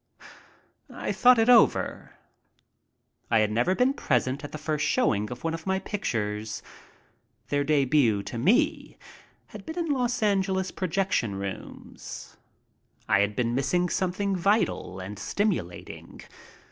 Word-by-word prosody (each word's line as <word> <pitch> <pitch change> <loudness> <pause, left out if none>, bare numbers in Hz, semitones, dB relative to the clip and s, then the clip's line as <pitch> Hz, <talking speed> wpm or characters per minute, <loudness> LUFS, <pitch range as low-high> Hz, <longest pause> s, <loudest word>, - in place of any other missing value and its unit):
I - - -4
thought 250 0 +5
it 225 0 +3
over. 240 -3 +3 1.1
I 115 - +3
had 105 -1 +2
never 120 +12 +1
been 250 +4 +3
present 130 - 0
at 145 - -7
the - - -6
first 155 -1 -2
showing 105 - +1
of 125 0 -8
one 165 0 -1
of 165 +2 -7
my 190 0 +1
pictures. 110 - -3 0.9
Their 145 0 +1
debut 135 -7 +2
to 120 - -6
me 245 - +1 0.5
had - - -10
been 320 +1 -7
in 330 -3 -1
Los 245 -3 0
AngelSs 190 -2 0
projection 185 - -1
rooms. 100 0 -8 0.7
I - - +4
had 100 +1 +1
been 120 -2 0
missing 160 +8 +1
something 190 +2 -1
vital 190 - 0
and 100 +3 -7
stimulating. 190 - -3
160 Hz, 135 wpm, -26 LUFS, -, 1.1 s, thought